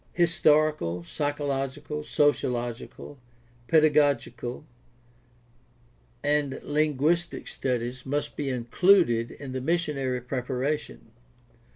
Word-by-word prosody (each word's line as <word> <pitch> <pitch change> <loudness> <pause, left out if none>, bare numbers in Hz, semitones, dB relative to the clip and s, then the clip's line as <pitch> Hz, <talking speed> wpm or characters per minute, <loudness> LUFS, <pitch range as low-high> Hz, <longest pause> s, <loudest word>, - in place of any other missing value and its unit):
Historical, 155 - +2
psychological, 145 - -3
sociological, 125 -2 -1 0.5
pedagogical, 145 -5 +2 1.6
and 145 -2 0
lin 150 -1 0
guistic 170 +5 0
studies 125 0 -3
must 145 +2 -2
be 145 -2 -2
included 125 0 +3
in 140 -2 -9
the 130 0 -3
missionary 140 -5 -1
preparation. 125 - -3
140 Hz, 75 wpm, -27 LUFS, 125-150 Hz, 1.6 s, included